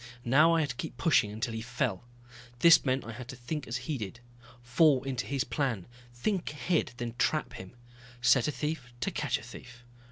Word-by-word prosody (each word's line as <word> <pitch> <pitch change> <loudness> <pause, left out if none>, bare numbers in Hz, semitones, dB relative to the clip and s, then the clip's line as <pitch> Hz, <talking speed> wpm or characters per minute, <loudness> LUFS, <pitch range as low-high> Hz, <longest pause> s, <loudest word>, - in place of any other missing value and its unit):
Now 150 +7 +5
I 165 - +3
had 150 - -1
to - - -9
keep 160 - -6
pushing 155 - +3
until 110 +2 -3
he 110 - -4
fell. 120 -3 -2 0.5
This 165 +5 +7
meant 130 -1 0
I 115 - -6
had 120 +2 -8
to 130 - -7
think 130 +5 -5
as 115 - -2
he 145 -2 -2
did, 105 +2 -6 0.4
fall 130 +2 +4
into 135 -2 -3
his 135 -1 0
plan, 130 - -2 0.3
think 180 - -2
ahead 150 -3 0
then 120 -1 -4
trap 155 -3 +1
him. 95 +5 -10 0.4
Set 125 0 +4
a - - +1
thief 150 -4 -4
to 195 - -1
catch 150 -6 -1
a - - -11
thief. 125 +1 -12
130 Hz, 200 wpm, -30 LUFS, 120-150 Hz, 0.5 s, This